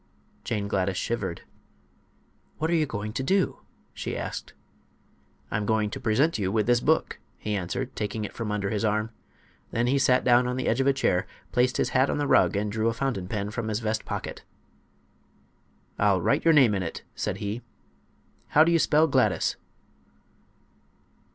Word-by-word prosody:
Jane 105 -3 -2
Gladys 95 -1 0
shivered. 115 -7 -3 1.1
"What 160 +2 -1
are - - +3
you 155 -2 +2
going 105 -3 -4
to - - -2
do?" 190 +8 +1 0.3
she - - -4
asked. - - -5 1.0
"I'm 105 -1 -1
going 110 -2 +1
to - - -5
present 125 +5 +1
you 95 -2 0
with 110 0 +1
this 120 0 +3
book," 160 +5 +1 0.2
he 105 - -4
answered, 90 -3 -3
taking 105 +1 -3
it - - -8
from 115 -3 -4
under 100 -2 -1
his 105 0 -1
arm. 110 +1 0 0.6
Then 115 - 0
he 135 +3 +2
sat 130 -1 +3
down 125 0 +4
on 125 +1 -2
the 130 - -2
edge 120 +4 +2
of 135 - +1
a - - +6
chair, 90 -8 0 0.2
placed 125 +4 +2
his - - +1
hat 130 +1 +2
on - - 0
the 145 - 0
rug 135 - +4
and 105 +1 -1
drew 110 +1 0
a 115 - +1
fountain 115 -7 -2
pen 105 +1 -3
from 110 0 -3
his 110 -1 -1
vest 110 -1 -2
pocket. - - -5 1.6
"I'll - - +3
write - - +1
your 165 - +6
name 130 -7 +6
in 95 - -1
it," 85 - -5
said - - -3
he. 105 +4 -4 0.9
"How 155 - +6
do 165 - +2
you 165 - +4
spell 155 0 +4
Gladys?" 135 -4 +2
115 Hz, 185 wpm, -26 LUFS, 105-135 Hz, 1.6 s, a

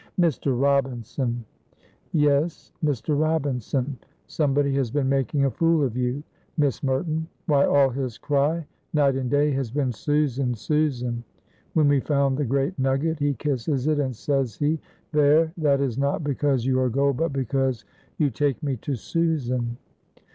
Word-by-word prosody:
"Mr. 145 -6 +1
Robinson!" 130 -3 0 0.7
"Yes, 150 +1 +1
Mr. 145 0 0
Robinson. 140 -4 -1 0.3
Somebody 140 -2 +1
has 135 -3 0
been 140 +2 0
making 135 +1 +1
a 135 - +1
fool 165 0 +2
of 125 -4 -1
you, 125 +3 -1 0.3
Miss 145 -5 +1
Merton. 155 +4 -1 0.2
Why, 145 -4 +4
all 140 -2 +4
his 125 -3 -4
cry 145 +3 0 0.3
night 140 -2 +4
and 130 -2 -2
day 145 +2 +3
has 135 -3 -1
been, 135 +1 0
'Susan! 135 0 0
Susan!' 125 -2 -1 0.5
When 155 -3 +4
we 145 -1 +4
found 140 -1 +1
the 145 - +1
great 140 +6 -1
nugget 135 +4 +1
he 145 -1 +1
kisses 135 0 -1
it, 155 -1 +2
and 130 -3 -1
says 135 -3 -1
he, 150 +2 0 0.3
'There, 150 +2 +4
that 145 -4 +2
is 135 -3 -1
not 140 +3 0
because 140 -3 0
you 130 -1 +2
are 130 -1 +2
gold, 140 +2 +1
but 165 -1 0
because 130 -3 -1 0.3
you 145 -4 +2
take 145 -3 -1
me 135 -3 -1
to 135 +5 -3
Susan.'" 125 -5 -1
140 Hz, 155 wpm, -24 LUFS, 130-150 Hz, 0.7 s, Why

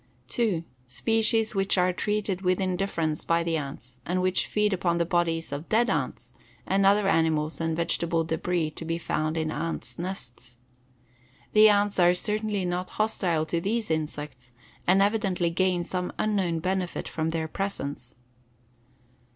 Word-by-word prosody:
2. 210 -9 0 0.2
Species 225 - +1
which 195 -1 +1
are 180 0 +3
treated 205 -1 -1
with 185 -1 +1
indifference 180 -4 -1
by 170 0 +2
the 165 -1 0
ants 135 -4 -6
and 180 +5 -1
which 185 0 +1
feed 210 -1 +1
upon 175 -2 +1
the 170 - +1
bodies 165 -2 0
of 145 +3 -5
dead 230 0 +3
ants 125 -6 -3 0.3
and 195 0 +3
other 200 0 +4
animal 160 -4 +2
and 165 -1 -1
vegetable 170 0 0
debris 160 0 -1
to 155 - -6
be 165 +1 -2
found 155 -1 -1
in 160 -1 -1
ants' 165 +2 -4
nests. 125 -9 -6 1.0
The 215 0 +8
ants 205 -1 +2
are 175 0 +5
certainly 210 0 -1
not 180 +1 -2
hostile 185 -7 +1
to 165 +1 -1
these 215 0 -1
insects 150 -5 -4 0.3
and 190 +2 +5
evidently 195 -5 +1
gain 180 0 +1
some 180 +1 -3
unknown 190 -6 0
benefit 185 0 -2
from 160 0 -2
their 160 -1 -2
presence. 145 -10 -4
175 Hz, 150 wpm, -27 LUFS, 160-195 Hz, 1.0 s, The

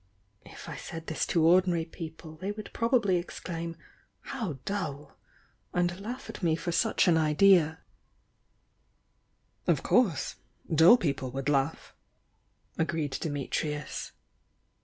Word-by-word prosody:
If - - -11
I - - -6
said 165 0 -7
this 160 - -2
to 165 -2 +2
ordinary 175 -1 +4
people, 160 -1 -9
they 190 +5 -3
would 210 0 -8
probably 230 -6 +2
exclaim 170 -1 -5 0.5
'How 220 - -4
dull!' 150 -8 -4 0.6
and 175 +1 +1
laugh 240 +5 -6
at - - -8
me 165 -3 +2
for 175 +2 -3
such 220 +3 +2
an 170 -2 +5
idea 160 +1 +4 1.0
" - - -42
"Of - - +2
course! 225 - +2 0.2
— - - -10
dull 165 +9 +8
people 140 - -2
would 135 +1 -2
laugh," 140 +2 0 0.9
agreed 160 -3 0
Dimitrius. 150 0 -3
165 Hz, 125 wpm, -29 LUFS, 155-185 Hz, 1.0 s, dull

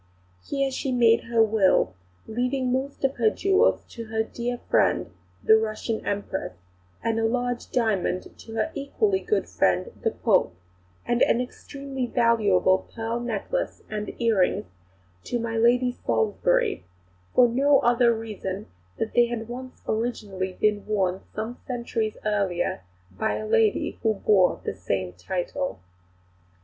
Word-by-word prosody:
Here 275 -1 -1
she 265 0 -2
made 230 -2 +4
her 230 -1 +4
will, 205 - +3 0.3
leaving 250 +3 -1
most 270 +2 -3
of 270 0 +1
her 225 -3 +4
jewels 390 - +2
to 230 -1 -7
her 220 0 -1
"dear 240 +2 -4
friend," - - +2 0.3
the 220 - +7
Russian 220 +1 -2
Empress; 200 - -3 0.5
a 230 - +2
large 240 +2 -1
diamond 210 -6 0
to 225 - -11
her 225 +8 0
equally 380 +8 0
good 425 - 0
friend 475 - +1
the 455 - +3
Pope; 200 - +1 0.5
and 240 0 0
an 235 - +4
extremely 270 +1 -5
valuable 205 -6 +3
pearl 230 +1 -2
necklace 240 - -3
and 210 -1 -5
earrings 225 -6 +2 0.6
to 245 - -1
my 230 -1 -3
Lady 245 +2 +3
Salisbury, 475 - 0 0.5
for 250 - +7
no 275 +4 +4
other 240 0 +4
reason 210 -3 -4 0.3
than 225 - -1
that - - -28
they 240 0 +5
had 230 -2 -4
been 255 +2 -7 0.2
originally 205 -5 -2 0.3
worn 190 -3 0
some 220 +3 -4
centuries 235 -3 -2
earlier 195 - 0 0.3
by 95 +2 -1
a 110 0 -4
lady 215 - +1
who 220 -1 +2
bore 195 -2 +3
the - - -2
same 95 0 -3
title. 180 - -3
230 Hz, 135 wpm, -25 LUFS, 210-250 Hz, 0.6 s, the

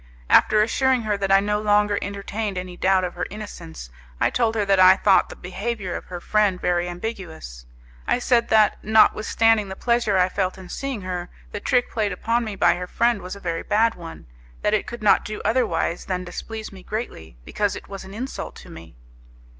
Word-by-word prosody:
After 215 0 +5
assuring 260 +2 +1
her 210 -1 0
that 195 -1 -2
I 195 - +7
no 210 +1 -1
longer 205 -1 +2
entertained 200 0 -4
any 180 0 -5
doubt 190 +1 +2
of 180 - -3
her 180 - -4
innocence, 170 - -9 0.3
I - - +2
told 230 -2 +1
her 210 -2 +1
that 195 -1 +3
I 185 0 +8
thought 195 -1 +4
the - - -9
behaviour 195 +1 -4
of - - -6
her 180 -1 -7
friend 205 -1 +1
very 175 0 0
ambiguous. 175 - -7 0.4
I - - +2
said 245 -1 +1
that, 215 -1 +4
notwithstanding 220 0 +3
the 190 - -6
pleasure 235 -3 +1
I 180 0 +4
felt 185 0 -2
in 185 -1 -11
seeing 270 -6 -4
her, 180 -1 -5 0.2
the - - -4
trick 245 +4 +1
played 215 -3 -1
upon 230 +6 0
me 215 -3 -5
by 175 -2 +3
her 180 0 -5
friend 235 +1 +1
was 180 +2 -7
a - - -10
very 165 -3 -3
bad 225 +2 +2
one, 165 -1 -10 0.4
that 210 - +2
it 215 - 0
could 240 -2 -7
not 210 - +5
do 215 0 -6
otherwise 215 -8 0
than 185 -1 -2
displease 220 +5 -7
me 190 -2 -12
greatly, 130 - -6
because 205 -2 -1
it - - -9
was 195 -1 -8
an 190 +1 -11
insult 255 +4 -6
to - - -13
me. 80 -5 -12
200 Hz, 205 wpm, -23 LUFS, 180-220 Hz, 0.4 s, I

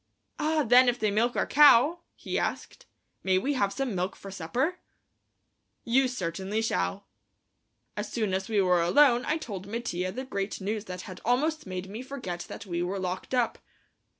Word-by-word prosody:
"Ah, 310 0 +1
then 245 +1 +6
if 245 - -1
they 215 -3 0
milk 235 +4 +1
our - - +1
cow," 295 +3 +6 0.2
he - - -3
asked, - - -4 0.4
"may 190 -1 +3
we 270 +10 0
have 200 -7 +1
some 255 +2 -2
milk 185 +1 -2
for 195 - -10
supper?" 250 - -2 1.0
"You 260 +3 +3
certainly 195 -2 -3
shall!" 90 - -1 0.9
As 210 0 -4
soon 215 -5 -1
as 190 +2 -2
we 215 -2 +2
were 180 -2 +3
alone 245 +7 +5
I 310 - +1
told 200 - -7
Mattia 185 -5 -3
the 260 +7 -5
great 200 -5 -3
news 210 +2 -3
that 180 -2 -6
had 185 -1 -10
almost 295 +4 0
made 185 0 -5
me 210 +5 -7
forget 250 -10 -6
that - - -8
we 175 -2 -3
were 180 +3 -2
locked 185 +6 -3
up. 245 -2 0
215 Hz, 180 wpm, -28 LUFS, 185-255 Hz, 1.0 s, then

